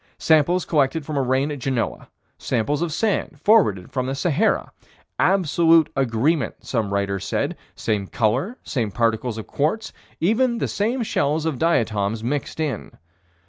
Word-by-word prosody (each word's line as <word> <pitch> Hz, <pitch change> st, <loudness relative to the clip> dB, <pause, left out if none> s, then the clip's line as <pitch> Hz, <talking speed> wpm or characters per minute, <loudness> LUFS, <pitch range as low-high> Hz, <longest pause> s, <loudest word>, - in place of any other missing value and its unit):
Samples 160 Hz, +3 st, +3 dB
collected 145 Hz, 0 st, +1 dB
from 155 Hz, -, -4 dB
a 140 Hz, -, +2 dB
rain 130 Hz, +3 st, +1 dB
at 145 Hz, -, -5 dB
Genoa 125 Hz, -2 st, -2 dB, 0.3 s
samples 135 Hz, +5 st, -1 dB
of 170 Hz, -2 st, -1 dB
sand 190 Hz, -4 st, -1 dB
forwarded 155 Hz, -, +3 dB
from 130 Hz, -1 st, -2 dB
the 135 Hz, -, -2 dB
Sahara 175 Hz, +7 st, +1 dB, 0.5 s
"absolute 165 Hz, -3 st, +4 dB
agreement" 135 Hz, +4 st, 0 dB
some 110 Hz, -5 st, -1 dB
writers 100 Hz, -1 st, -1 dB
said: -, -, -1 dB, 0.2 s
same 105 Hz, -3 st, -1 dB
color, 130 Hz, -, 0 dB
same 120 Hz, -7 st, -2 dB
particles 115 Hz, +1 st, 0 dB
of 110 Hz, -, -6 dB
quartz, 190 Hz, +10 st, -1 dB, 0.3 s
even 235 Hz, +7 st, +2 dB
the -, -, -1 dB
same 230 Hz, +5 st, -1 dB
shells 155 Hz, -5 st, 0 dB
of 155 Hz, -6 st, -2 dB
diatoms 110 Hz, -9 st, +1 dB
mixed 145 Hz, +5 st, -3 dB
in. 155 Hz, -4 st, -3 dB
140 Hz, 145 wpm, -22 LUFS, 115-165 Hz, 0.5 s, absolute